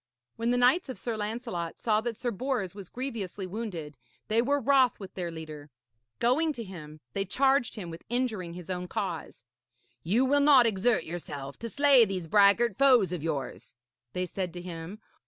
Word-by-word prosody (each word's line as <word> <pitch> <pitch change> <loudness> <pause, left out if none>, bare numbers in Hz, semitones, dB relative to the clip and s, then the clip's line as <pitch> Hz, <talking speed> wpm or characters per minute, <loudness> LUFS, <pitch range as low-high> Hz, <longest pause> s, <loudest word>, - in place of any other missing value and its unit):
When 230 +1 -1
the 245 - +2
knights 260 +7 +3
of 260 - -5
Sir 235 -2 -3
Lancelot 210 -5 -4
saw 215 -2 +2
that 230 -1 -4
Sir 240 0 -2
Bors 235 -4 -2
was 200 -3 -10
grievously 225 -7 -4
wounded, 180 - -6 0.3
they 220 +2 +3
were 285 +4 +1
wroth 265 -1 +3
with 195 -2 -9
their 175 -2 -3
leader. 155 -3 -8 0.5
Going 300 +7 +2
to 235 - -6
him, 155 -6 -10
they 195 - 0
charged 265 +5 +2
him 180 -6 -6
with 165 - -10
injuring 220 -9 -2
his 180 +1 -7
own 180 0 -3
cause. 175 - -5 0.6
'You 220 +10 +2
will 285 +2 +3
not 280 -4 +7
exert 220 +2 +2
yourself 145 -5 -7
to 230 - -5
slay 280 -1 +6
these 190 -5 -2
braggart 200 +4 +4
foes 255 -9 +5
of 175 - -3
yours,' 145 -5 -4 0.4
they 180 0 -1
said 180 -1 -4
to 175 - -6
him. 175 +2 -7
210 Hz, 180 wpm, -29 LUFS, 175-245 Hz, 0.6 s, not